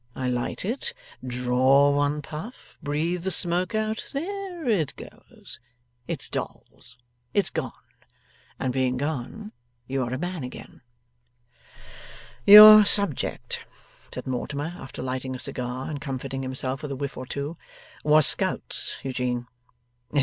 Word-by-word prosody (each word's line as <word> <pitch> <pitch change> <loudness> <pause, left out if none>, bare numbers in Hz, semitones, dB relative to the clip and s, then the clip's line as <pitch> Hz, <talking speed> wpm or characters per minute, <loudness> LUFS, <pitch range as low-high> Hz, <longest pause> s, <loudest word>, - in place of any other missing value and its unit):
I 130 -1 -2
light 125 +7 -3
it 280 - -4 0.3
draw 130 +3 +3
one 145 +1 0
puff 160 - -10
breathe 160 +5 -2
the 190 - -1
smoke 180 +2 0
out 215 0 -2
there 355 +1 -5
it 185 - 0
goes - - -12 0.5
it's - - -4
Dolls! - - -7 0.4
it's 200 -3 +1
gone 135 -7 -3 0.9
and 130 -1 -1
being 130 -1 0
gone 155 - -4 0.3
you 135 +1 -2
are 120 -1 -3
a 130 - -2
man 175 0 -4
again.' 125 - -10 1.7
'Your 215 +1 +12
subject,' 200 -7 +2 0.5
said - - -7
Mortimer, 140 +5 -4
after 135 -6 -8
lighting 130 0 -4
a - - -5
cigar, 125 +1 -4
and 145 -2 -5
comforting 135 -2 -5
himself 130 +1 -3
with 150 - -6
a 140 - -4
whiff 140 +1 -5
or 130 - -7
two, 145 +5 -4 0.5
'was 150 0 +6
scouts, - - +1
Eugene. 125 -2 -2
145 Hz, 130 wpm, -25 LUFS, 130-180 Hz, 1.7 s, Your